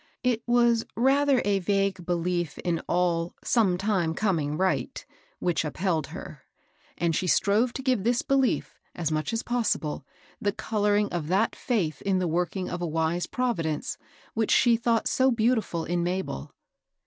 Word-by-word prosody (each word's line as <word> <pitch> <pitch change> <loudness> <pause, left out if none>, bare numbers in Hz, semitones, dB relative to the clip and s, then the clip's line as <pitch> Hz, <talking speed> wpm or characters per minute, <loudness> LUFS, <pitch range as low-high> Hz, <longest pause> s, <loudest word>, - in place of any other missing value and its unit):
It 245 -3 +1
was 240 -1 +3
rather 270 +2 +3
a 200 -1 +2
vague 195 -1 0
belief 175 -2 -1
in 170 -2 -1
all 175 -1 0
" - - -28
sometime 190 -5 +1
coming 160 -8 0
right,'* 190 +2 -1 0.3
which 175 -3 0
up 150 - -5
held 165 -5 0
her; - - -9 0.6
and 170 -2 +1
she 185 - -1
strove 215 +7 +3
to 265 - -5
give 255 -7 +1
this 240 +2 +1
belief, 270 -2 0 0.2
as 165 -3 -2
much 155 +5 -1
as 225 0 -2
possible, 220 - -1 0.4
the 205 -1 0
coloring 210 -1 +1
of 165 -4 -2
that 195 +6 +1
faith 170 - -1
in 195 -1 +1
the 185 -1 0
work 170 +2 -1
ing 185 -2 -2
of 175 - -4
a 175 - -1
wise 160 +2 -1
Providence, 170 -12 -2 0.3
which 220 -1 0
she 240 -2 +5
thought 230 -1 +1
so 260 0 +3
beautifiil 220 -7 0
in 175 0 0
Mabel. 175 - -3
190 Hz, 165 wpm, -27 LUFS, 170-230 Hz, 0.6 s, she